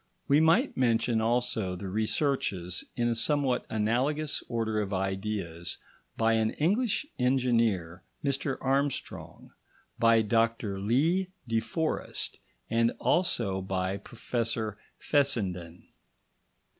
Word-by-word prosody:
We 140 +2 +5
might 165 - +3
mention 115 -2 +2
also 115 -5 0
the 95 +2 -6
researches, 105 - 0
in 120 -1 +1
a 120 - +2
somewhat 135 +1 +1
analogous 130 +8 0
order 110 -3 0
of 100 -1 -4
ideas, 95 -3 -3 0.4
by 115 0 +3
an 110 -1 +2
English 210 - +1
engineer, 115 -9 +1 0.2
Mr 140 0 -1
Armstrong, 135 +1 -2 0.5
by 115 -1 +5
Dr 115 -2 +1
Lee 155 - +2 0.2
de 115 0 +2
Forest, 155 +9 -3 0.3
and 115 0 +2
also 115 - +1
by 95 0 -1
Professor 115 0 -3 0.2
Fessenden. 95 - 0
115 Hz, 105 wpm, -29 LUFS, 100-135 Hz, 0.5 s, We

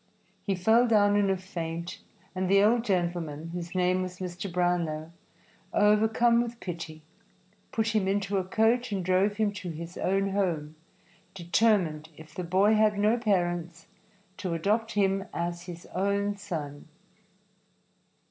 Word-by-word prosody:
He 195 -3 -1
fell 220 +7 +4
down 205 -2 +4
in 205 -1 +3
a 190 - +1
faint, 170 -2 -5 0.3
and 185 -1 -2
the 200 +1 +5
old 225 +2 +3
gentleman, 170 -6 -2
whose 175 +1 -6
name 185 0 +2
was 185 0 -5
Mr. 180 +1 -5
Brownlow, 170 -3 -1 0.6
overcome 220 +3 +4
with 235 0 -5
pity, 165 -3 -7 0.7
put 220 -1 0
him 215 -3 +1
into 200 0 0
a - - -1
coach 225 +5 +1
and 190 -3 -2
drove 190 +3 +2
him 215 -2 +1
to 185 -3 -6
his 165 +2 -7
own 195 +1 +1
home, 170 -6 -1 0.6
determined, 175 -4 +1
if 155 0 -13
the 180 - -4
boy 190 +5 +3
had 215 -1 +3
no 210 +3 +3
parents, 175 -6 -1 0.5
to 180 -4 -3
adopt 215 +7 0
him 195 -1 +1
as 170 0 -3
his 170 -1 -8
own 200 +2 0
son. 160 -8 -6
190 Hz, 145 wpm, -28 LUFS, 175-205 Hz, 0.7 s, the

